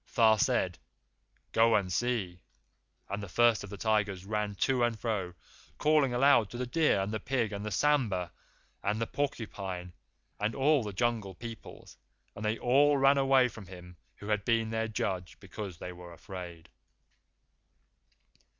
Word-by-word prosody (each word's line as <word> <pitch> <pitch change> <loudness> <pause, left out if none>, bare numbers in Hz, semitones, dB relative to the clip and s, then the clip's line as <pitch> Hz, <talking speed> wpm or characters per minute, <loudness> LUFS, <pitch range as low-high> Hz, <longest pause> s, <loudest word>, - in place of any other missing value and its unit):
Tha 110 -2 +6
said, - - +1 0.7
'Go 115 0 +4
and 95 -4 0
see.' 100 -6 -1 0.7
And 100 +1 -4
the 100 - -7
First 120 +2 +3
of 105 - -8
the 100 - -8
Tigers 100 -3 0
ran 105 0 -2
to 125 +4 +1
and 120 -2 0
fro, 100 -7 -2 0.4
calling 150 -3 +3
aloud 120 -4 +4
to 120 - -7
the 125 - -2
deer 155 -3 +2
and 100 +2 -2
the 110 - -1
pig 125 -5 -1
and 100 0 -5
the 105 - -3
sambhur 110 -11 +1 0.5
and 105 +2 -1
the 115 - 0
porcupine 95 -10 -4 0.5
and 105 +2 -1
all 145 +1 +3
the 105 -2 -4
Jungle 110 -2 -1
Peoples, 115 +1 -10 0.4
and 105 - -7
they 110 +1 0
all 140 +4 +4
ran 135 +1 +5
away 135 -2 +4
from 105 -4 -11
him 90 -1 -11 0.2
who 105 - -9
had 105 -1 +1
been 115 0 +1
their 115 0 -1
judge, 95 -5 -3
because 100 -2 -7
they 90 +2 -7
were 90 0 -11
afraid. 90 -2 -9
110 Hz, 160 wpm, -30 LUFS, 95-120 Hz, 0.7 s, Tha